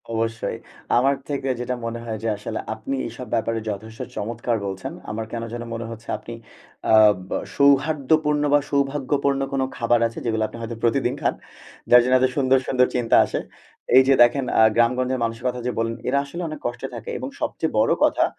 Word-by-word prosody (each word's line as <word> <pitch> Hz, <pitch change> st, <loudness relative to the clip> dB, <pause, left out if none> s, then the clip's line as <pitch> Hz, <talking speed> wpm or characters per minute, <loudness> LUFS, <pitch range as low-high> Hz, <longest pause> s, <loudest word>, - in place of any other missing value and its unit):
অবশ্যই। 115 Hz, 0 st, -2 dB, 0.4 s
আমার 135 Hz, +3 st, +3 dB
থেকে 140 Hz, -2 st, -2 dB
যেটা 125 Hz, +1 st, -2 dB
মনে 115 Hz, 0 st, -4 dB
হয় 110 Hz, -2 st, -4 dB
যে, -, -, -1 dB
আসলে 105 Hz, -, -5 dB
আপনি 135 Hz, -, -4 dB
এসব 120 Hz, +2 st, -9 dB
ব্যাপারে 115 Hz, 0 st, 0 dB
যথেষ্ট 110 Hz, +2 st, -7 dB, 0.2 s
চমৎকার 115 Hz, +2 st, -2 dB
বলছেন। 95 Hz, -1 st, -5 dB, 0.2 s
আমার 110 Hz, +1 st, -4 dB
কেনো 115 Hz, 0 st, -4 dB
যেন 120 Hz, 0 st, -4 dB
মনে 115 Hz, 0 st, -4 dB
হচ্ছে, 115 Hz, 0 st, -10 dB
আপনি 115 Hz, -, -9 dB, 0.6 s
আ -, -, +5 dB, 0.4 s
বা -, -, -1 dB, 0.2 s
সৌহার্দ্যপূর্ণ 150 Hz, +1 st, +3 dB
বা 145 Hz, -, +6 dB
সৌভাগ্যপূর্ণ 140 Hz, 0 st, 0 dB
কোন 135 Hz, -, +1 dB, 0.2 s
খাবার 120 Hz, 0 st, +2 dB
আছে, 115 Hz, -, -8 dB
যেগুলো 110 Hz, -1 st, 0 dB
আপনি -, -, -11 dB
হয়তো 115 Hz, 0 st, -5 dB
প্রতিদিন 120 Hz, +1 st, +2 dB
খান। -, -, +1 dB, 0.6 s
যার 125 Hz, -, +9 dB
জন্যে 130 Hz, +1 st, +4 dB
এত 130 Hz, -, +4 dB
সুন্দর, 135 Hz, -1 st, +4 dB
সুন্দর 125 Hz, -1 st, +3 dB
চিন্তা 120 Hz, -2 st, +2 dB
আসে। -, -, -3 dB, 0.6 s
এই 130 Hz, -, +9 dB
যে 135 Hz, -, +6 dB
দেখেন 125 Hz, +3 st, +2 dB
আ -, -, +7 dB
গ্রামগঞ্জের 125 Hz, +2 st, +2 dB
মানুষের 115 Hz, +2 st, -3 dB
কথা 125 Hz, 0 st, -2 dB
যে -, -, 0 dB
বললেন। 115 Hz, 0 st, -1 dB
এরা 140 Hz, +2 st, +2 dB
আসলে 170 Hz, +5 st, -7 dB
অনেক 155 Hz, -2 st, -6 dB
কষ্টে 120 Hz, 0 st, -3 dB
থাকে -, -, -7 dB
এবং -, -, -5 dB
সবচেয়ে -, -, -2 dB
বড় -, -, +3 dB
কথা, -, -, +3 dB
120 Hz, 190 wpm, -23 LUFS, 115-135 Hz, 0.6 s, যার